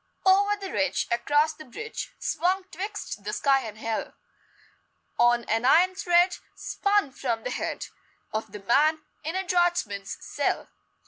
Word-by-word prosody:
Over 400 +2 +5
the 390 -2 -7
ridge, 285 -2 0
Across 295 +6 +2
the 310 - -10
bridge, 435 - -6
Swung 365 +4 0
twixt 400 +5 -5
the - - -3
sky 275 -1 +3
and 220 -3 -7
hell, 225 0 -3 1.0
On 240 0 +4
an 225 +1 0
iron 345 +8 +5
thread 355 -1 +3 0.2
Spun 400 -8 +1
from 235 -4 -2
the 250 - -3
head - - -3 0.5
Of 215 +1 -3
the 210 - -8
man 305 +8 +3 0.2
in 320 +3 -3
a 380 - 0
draughtsman's 350 - 0
cell. - - -2
310 Hz, 145 wpm, -27 LUFS, 240-370 Hz, 1.0 s, Over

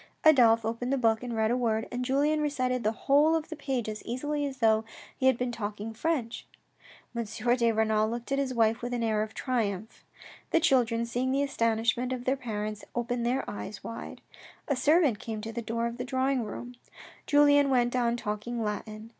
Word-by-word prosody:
Adolphe 230 -7 +6
opened 235 +3 -2
the 275 - +2
book 225 -3 +2
and 245 -2 -4
read 220 0 +1
a - - +2
word, 225 -3 0
and 245 +1 -2
Julien 290 +4 +1
recited 255 -4 0
the 215 - +2
whole 295 +4 +5
of 320 0 -2
the 320 - -5
page 265 -6 -2
as 215 0 -5
easily 290 +4 -2
as 270 -1 -7
though 220 -2 +3 0.3
he 260 - +1
had 260 -2 +4
been 250 0 -2
talking 210 -1 -5
French. 245 -2 -2 0.7
M. 235 - -1
de 235 +2 +1
Renal 220 -1 +2
looked 235 +3 -5
at 275 - +1
his 275 -2 -1
wife 225 -1 +2
with 245 0 -3
an 235 - -1
air 215 -2 +1
of 215 0 -4
triumph 220 -5 -2 0.5
The 330 - +3
children, 240 -7 +2
seeing 245 +2 -1
the 275 +1 +2
astonishment 235 -1 0
of 250 -1 -5
their 265 - +2
parents, 215 -4 -4
opened 240 0 -1
their 260 +3 0
eyes 205 0 -7
wide. 230 - -7 0.5
A 280 - +1
servant 295 - +3
came 220 -2 -5
to 225 +1 -5
the 235 - -3
door 230 +1 -2
of 235 0 -3
the 250 - -3
drawing 260 0 0
room; 245 +3 -7 0.5
Julien 285 -1 +5
went 245 -2 +2
on 240 -1 +1
talking 225 +2 -3
Latin. 215 +1 -5
240 Hz, 200 wpm, -28 LUFS, 225-260 Hz, 0.7 s, Adolphe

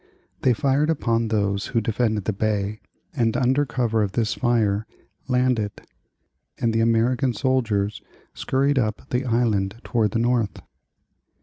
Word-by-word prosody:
They 125 - +4
fired 140 +5 +1
upon 115 -7 +1
those 100 -2 0
who 115 - 0
defended 110 -2 -1
the 110 - 0
bay, 105 0 -1 0.4
and 115 -4 +1
under 135 +3 +2
cover 120 -3 0
of 100 -2 -1
this 115 -1 0
fire 110 -4 +1 0.4
landed; 125 -5 +1 0.8
and 115 -2 0
the 115 - +2
American 120 +3 +2
soldiers 110 -5 0 0.3
scurried 135 +1 +1
away 110 - +2
up 110 +4 -8
the 125 +2 0
island 110 -5 +1
toward 115 -4 +1
the 105 - -2
north. 120 -2 0
115 Hz, 140 wpm, -23 LUFS, 105-125 Hz, 0.8 s, They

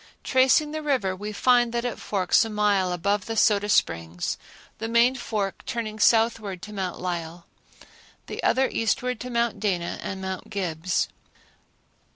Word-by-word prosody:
Tracing 265 +3 +3
the 310 0 -4
river, 255 -11 0
we 205 +3 -5
find 240 +2 +3
that 235 0 -1
it 245 - -3
forks 195 +2 +2
a 225 - -4
mile 205 -3 +2
above 195 +3 -1
the 225 0 -3
Soda 205 -1 +3
Springs, 85 - 0 0.4
the 225 - -3
main 235 +2 +4
fork 210 -6 -3
turning 220 -2 -4
southward 220 -5 +2
to 210 - -8
Mount 190 -3 -3
Lyell, 170 -1 -4 0.8
the - - -6
other 265 0 +3
eastward 250 +2 -1
to 250 - -6
Mount 235 -3 0
Dana 180 -5 -1
and 190 - -5
Mount 190 -1 -5
Gibbs. 180 -3 -1
210 Hz, 155 wpm, -25 LUFS, 185-235 Hz, 0.8 s, main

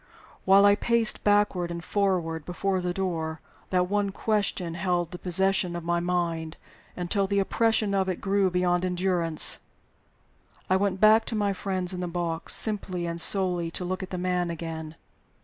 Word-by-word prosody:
While 195 +1 +6
I 205 - +6
paced 230 +1 +2
backward 205 -4 +2
and 170 0 -6
forward 180 -6 -1
before 185 +3 -2
the 180 0 -2
door, 165 -4 -3 0.3
that 180 -1 +1
one 205 +1 0
question 195 -4 -1
held 175 -1 -1
possession 190 0 +1
of 175 - -5
my 170 +1 0
mind, 170 -2 -2 0.4
until 195 +3 -1
the 200 +1 -1
oppression 215 +1 +1
of 190 -1 +1
it 180 - -3
grew 195 -1 +1
beyond 180 0 0
endurance. 180 -3 +3 1.1
I - - +5
went 195 0 0
back 215 +2 +6
to 230 - -3
my 205 -2 0
friends 185 -1 -3
in 180 - -5
the 180 - -3
box, 170 -1 -1
simply 190 -5 -2
and 170 0 -3
solely 180 -4 +1
to 180 +2 -5
look 185 +1 -3
at 185 - -6
the 185 - -5
man 180 -1 -1
again. 160 -1 -6
180 Hz, 165 wpm, -26 LUFS, 175-195 Hz, 1.1 s, While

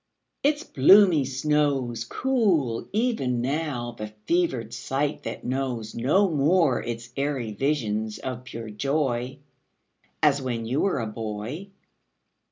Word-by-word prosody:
Its 295 +2 +1
bloomy 175 - +6
snows 135 -3 0
Cool 180 - +1
even 210 - 0
now 130 -2 -2
the 105 -2 -6 0.2
fevered 130 -10 0
sight 140 +4 -2
that - - -6
knows 125 -4 -2
No 155 - +3
more 155 -2 +3
its 120 0 -5
airy 135 -5 -1
visions 110 -5 -1
of 125 -1 -5
pure 115 -3 -7
joy 130 +1 -1 0.9
As 145 -2 +4
when 120 -3 -3
you 130 +6 0
were 195 - +1
a 115 - -2
boy. 110 - -5
135 Hz, 120 wpm, -25 LUFS, 120-155 Hz, 0.9 s, bloomy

